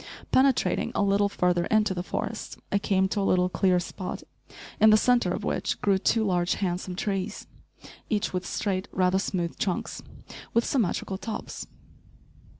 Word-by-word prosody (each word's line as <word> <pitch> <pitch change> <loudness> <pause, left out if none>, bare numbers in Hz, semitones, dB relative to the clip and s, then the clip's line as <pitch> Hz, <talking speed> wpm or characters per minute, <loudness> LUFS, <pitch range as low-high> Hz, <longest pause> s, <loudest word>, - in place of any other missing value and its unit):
Penetrating 265 -1 +3
a - - +2
little 200 0 +3
further 180 -3 +1
into 215 -2 +2
the 175 - -3
forest, 180 - -4
I 200 - +2
came 190 -1 +2
to 205 - -1
a - - +1
little 180 -2 +2
clear 185 -1 +2
spot, 180 +1 -6 0.6
in 220 - +7
the 215 - +7
centre 240 -4 +3
of 200 - -3
which - - -1
grew 195 -2 +2
two 225 +3 +2
large, 175 -2 +1
handsome 180 -1 -2
trees, 195 -1 -3 0.6
each 210 -3 0
with 180 0 -1
straight, 190 +1 -2
rather 185 0 +2
smooth 175 -3 -2
trunks, 185 -4 -2 0.5
with 235 - +3
symmetrical 195 -5 -1
tops. 220 -1 -6
195 Hz, 155 wpm, -27 LUFS, 180-210 Hz, 0.6 s, in